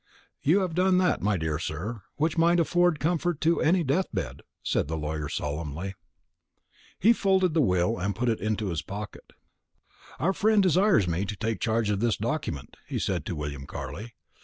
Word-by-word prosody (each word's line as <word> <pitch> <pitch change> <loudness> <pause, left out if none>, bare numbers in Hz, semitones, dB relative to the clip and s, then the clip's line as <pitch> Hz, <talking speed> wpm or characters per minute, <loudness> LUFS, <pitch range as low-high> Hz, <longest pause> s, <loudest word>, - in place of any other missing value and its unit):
"You 175 +8 +3
have 180 -3 -2
done 180 +2 +3
that, 185 -1 +2
my 105 -1 +1
dear 80 -1 -2
sir, 95 +8 -4
which 155 +2 0
might 170 +1 +4
afford 175 -1 +2
comfort 170 0 0
to 165 +1 +2
any 175 +2 +3
death 160 +7 +1
bed," 70 -9 -4 0.2
said - - 0
the 80 +1 -3
lawyer 75 -1 -3
solemnly. 75 +5 -4 1.0
He 225 +5 +5
folded 190 -5 +2
the 160 - +3
will, 90 0 +2
and 100 +1 -1
put 125 +4 -1
it 115 -2 +1
into 110 -1 -1
his 80 -3 -2
pocket. 105 +5 -8 0.8
"Our 190 +5 +1
friend 215 0 +3
desires 185 - +4
me 85 +3 0
to 105 - -4
take 110 +2 -2
charge 110 -2 +1
of 100 - 0
this 115 0 +1
document," 110 - -3
he - - -3
said 85 -6 -2
to 85 - -3
William 70 -2 -5
Carley. 100 - -7
110 Hz, 185 wpm, -27 LUFS, -, 1.0 s, He